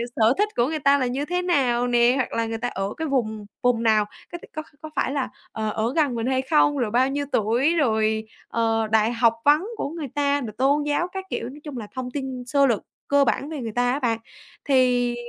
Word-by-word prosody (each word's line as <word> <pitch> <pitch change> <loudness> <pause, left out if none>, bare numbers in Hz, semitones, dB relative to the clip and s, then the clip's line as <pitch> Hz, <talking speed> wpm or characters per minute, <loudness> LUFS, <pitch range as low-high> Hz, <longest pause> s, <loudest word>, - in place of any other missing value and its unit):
sở 225 +2 +4
thích 420 +1 +2
của 240 +1 +2
người 310 0 -2
ta 280 0 +4
là 255 -3 0
như 270 +4 -2
thế 360 +3 -1
nào 250 -8 +1
nè, 240 0 +4
hoặc 260 - -1
là 230 0 0
người 225 0 -3
ta 245 +2 -2
ở 195 -2 -3
cái 320 - -2
vùng 220 -6 -1 0.2
vùng 245 -2 +2
nào, 215 -2 +4 0.3
có 345 - -5
t - - -19
có 310 - -3 0.2
có 310 - -7
phải - - 0
là, 275 -3 -1 0.2
ờ, 220 -1 -2
ở 225 +4 -1
gần 290 -6 +2
mình 230 +2 -2
hay 260 0 +1
không, 290 +1 +3
rồi 235 -5 -1
bao 255 +3 +3
nhiêu 285 +1 -2
tuổi, 240 +10 +2
rồi, 220 -6 +1 0.2
ờ, 225 -1 0
đại 220 +1 +3
học 230 -1 +3
vấn 295 +3 +5
của - - -2
người 320 -2 -5
ta 285 0 +1
rồi 230 -4 -5
tôn 285 +3 +2
giáo 295 +4 0
các 380 0 -5
kiểu, 235 - -3
nói 290 +3 -11
chung 290 -5 -7
là 215 -3 -6
thông 250 -1 -4
tin 265 -3 -4
sơ 280 +2 +3
lược 235 -5 +1 0.3
cơ 285 0 +4
bản 275 +4 -1
về 310 -3 -5
người 225 -2 -4
ta 245 0 +2
á 275 - -1
bạn. 230 -4 0 0.5
Thì, 250 -3 +3
255 Hz, 245 wpm, -24 LUFS, 230-285 Hz, 0.5 s, vấn